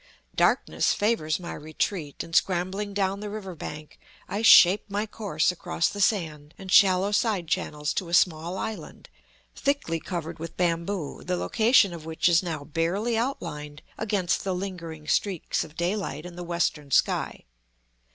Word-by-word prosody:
Darkness - - +2
favors 205 -8 0
my 175 - -6
retreat, 155 0 -3
and 165 - -7
scrambling 190 +3 +1
down 195 0 -1
the 210 0 -5
river 200 -3 -6
bank, 150 -1 -9 0.3
I 205 - -3
shape 200 -3 +7
my 205 +2 -1
course 210 -3 0
across 170 -1 -1
the 205 - -5
sand 160 -7 0
and 190 -1 -8
shallow 190 +1 +5
side 205 -4 +1
channels 150 -2 -2
to 180 - -3
a - - -7
small 170 +1 +2
island, 220 +2 -6 0.5
thickly 280 - -1
covered 170 -2 -5
with 165 +1 -7
bamboo, 170 -1 -1
the 180 0 -1
location 220 -2 +3
of 165 -2 -8
which 160 +2 0
is 170 -1 +5
now 160 -5 -4
barely 170 +10 -1
outlined 155 - -4
against 205 -5 -1
the 190 -2 -1
lingering 170 -5 -6
streaks 190 0 0
of 160 -1 -13
daylight 175 -4 -2
in 175 -1 -9
the 175 - -6
western 170 -4 -1
sky. - - +1
180 Hz, 155 wpm, -26 LUFS, 160-200 Hz, 0.5 s, shape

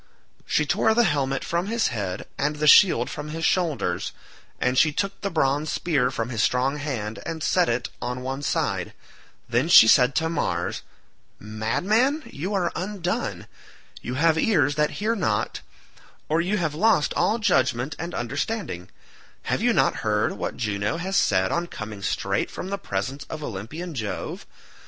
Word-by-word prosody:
She - - +2
tore 220 - +2
the 240 - +5
helmet 140 - 0
from 170 +3 -1
his 230 +1 +1
head 95 -6 -4
and 150 +2 -1
the 150 0 -2
shield 180 +5 +6
from 150 -3 -6
his 160 +1 -3
shoulders, 170 -6 0 0.5
and 125 0 +1
she 150 +4 +4
took 195 +5 -3
the 200 - -1
bronze 150 -2 0
spear 140 -7 +1
from 120 -2 -3
his 115 -3 -1
strong 130 +5 +1
hand 120 -7 -4
and 160 -2 -5
set 180 +2 +2
it 120 +1 -1
on 125 +1 -4
one 135 +2 -4
side; - - -1 0.5
then 125 +7 +1
she 110 - +9
said 125 +3 +5
to 160 - +1
Mars, 90 - -2 0.6
"Madman, 200 - 0
you 170 +9 -5
are 180 -3 0
undone; 185 -1 -3 0.6
you 125 - -4
have 160 +3 +3
ears 155 - +3
that 150 0 +1 0.2
hear 225 +1 +2
not, 110 - -1 0.7
or 160 +2 +2
you 190 +5 0
have 165 -5 -1
lost 190 -1 +2
all 220 - +2
judgement 135 - +1
and 170 +1 -5
understanding; 130 - -3 0.5
have - - -1
you - - +3
not - - +2
heard 105 0 0
what - - -4
Juno 105 +4 -1
has 190 +3 -3
said 95 - +2
on 170 0 -1
coming 110 -8 -7
straight 100 0 -1
from 185 - -6
the 200 - -2
presence 130 - -4
of 155 -1 -7
Olympian 145 - -6
Jove? 110 -7 -5
145 Hz, 165 wpm, -24 LUFS, 120-175 Hz, 0.7 s, she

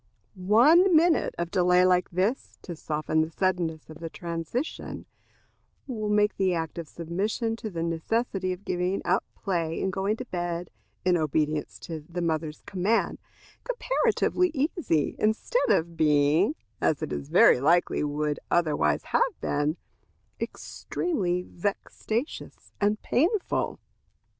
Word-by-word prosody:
One 260 - +5
minute 330 +1 +3
of 170 0 -3
delay 180 0 +4
like 180 -1 +3
this, 190 +9 -1
to 175 - -6
soften 155 0 -1
the 160 - -1
suddenness 165 -3 -1
of 155 0 -11
the 165 -1 -5
transition, 170 - -4 0.8
will 215 -6 -3
make 210 0 +2
the 190 -2 +2
act 165 0 -3
of 165 - -6
submission 200 +8 -2
to 225 -1 -5
the 165 -4 -3
necessity 185 +3 -1
of 185 +2 -7
giving 180 +2 -1
up - - +2
play 165 -4 -2
and 190 - -1
going 195 +3 0
to 255 - -6
bed, 175 -3 -4 0.3
in 180 -1 +4
obedience 155 -1 -1
to 160 -3 -6
the 175 +1 -4
mother's 155 -2 -2
command, 195 +5 0 0.4
comparatively 475 -6 +1
easy, 275 - 0
instead 220 - +1
of 165 +1 +2
being, 155 - +3 0.3
as 155 - +1
it - - -4
very 70 - +4
likely 170 +3 +3
would 150 0 -1
otherwise 165 -4 +2
have - - 0
been, 145 +3 0 0.6
extremely 180 - -2
vexatious 210 - -4
and 210 +1 +2
painful. 360 - 0
180 Hz, 130 wpm, -27 LUFS, 160-220 Hz, 0.8 s, One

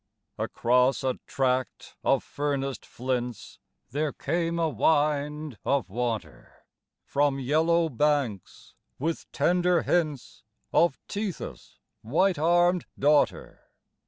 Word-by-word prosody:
Across 125 +3 +2
a 130 -1 -1
tract 130 -1 -1
of - - +2
furnaced 140 -2 -3
flints 125 -2 -4 0.3
there 150 +2 -1
came 170 +4 -1
a 165 -1 +2
wind 150 -1 0
of 140 -8 0
water, 110 - -4 0.4
From 140 -1 +1
yellow 160 +5 +2
banks 140 - -1 0.2
with 160 +4 -3
tender 180 -1 +2
hints 155 -7 -1 0.3
of 170 -5 +4
Tethys' 200 -3 -5 0.2
white 165 - +1
armed 175 +2 +3
daughter. 145 +1 +2
145 Hz, 100 wpm, -27 LUFS, 130-165 Hz, 0.4 s, of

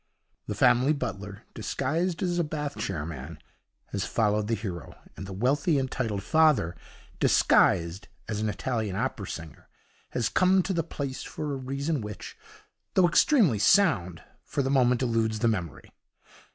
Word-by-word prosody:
The - - -3
family 130 +5 +4
butler, 100 -8 -5
disguised 170 +3 -2
as 175 -1 0
a - - +3
Bath 150 -2 -4
chair 80 -6 -3
man, 80 0 -7 0.5
has - - -2
followed 105 -1 +1
the 115 - +1
hero, 95 - -6 0.2
and 95 - -8
the - - -7
wealthy 140 - +1
and 130 -1 -1
titled 105 -6 -2
father, 150 - +3 0.4
disguised 85 +4 +3 0.2
as 105 -1 -3
an 110 - 0
Italian 110 -2 -2
opera 110 -3 -2
singer, 80 -2 -8 0.4
has 120 - -1
come 185 0 +3
to 190 +3 -2
the 170 - +1
place 140 -4 -5
for 150 -2 -5
a - - -2
reason 135 +2 -2
which, 105 -1 -8 0.6
though 185 -2 +6
extremely 175 - +4
sound, 95 - +3 0.2
for 140 - -2
the 135 - -1
moment 125 -2 +3
eludes 115 -2 +1
the 115 +2 +1
memory. 90 - -3
120 Hz, 155 wpm, -27 LUFS, 100-150 Hz, 0.6 s, though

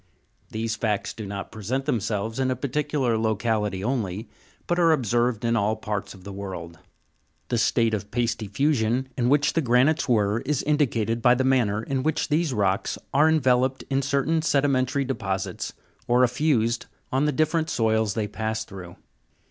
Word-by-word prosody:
These 110 +1 -2
facts 105 -3 -1
do 110 -2 -7
not 100 0 -6
present 120 +6 -3
themselves 110 -3 -1
in 130 -1 +1
a 130 - 0
particular 135 -2 -1
locality 105 -3 0
only, 110 -4 -2 0.4
but 175 0 0
are 165 -1 +5
observed 120 -3 0
in 115 0 +2
all 110 0 +1
parts 105 -2 -4
of 95 - -15
the 100 0 -8
world. 90 -4 -7 0.7
The 120 - +1
state 115 0 +2
of 105 -1 -3
pasty 115 -1 -1
fusion 130 +1 +1
in 120 -1 +1
which 145 +1 +3
the 165 - +2
granites 130 +4 +2
were, 105 -2 +2
is 140 +2 -1
indicated 120 -7 +1
by 120 +1 +5
the 130 - 0
manner 120 -5 +2
in 135 +2 -1
which 155 +2 -1
these 155 0 +1
rocks 100 -4 0 0.2
are 150 +3 +5
enveloped 130 -3 +2
in 135 0 +2
certain 140 +4 +1
sedimentary 140 -3 +1
deposits, 95 -7 -3 0.4
or 125 +1 +4
effused 120 -3 +1 0.2
on 135 +3 +2
the 150 - +2
different 155 +3 +1
soils 110 -2 +1
they 110 -2 -1
pass 110 +1 -3
through. 95 -5 -10
120 Hz, 165 wpm, -25 LUFS, 110-135 Hz, 0.7 s, are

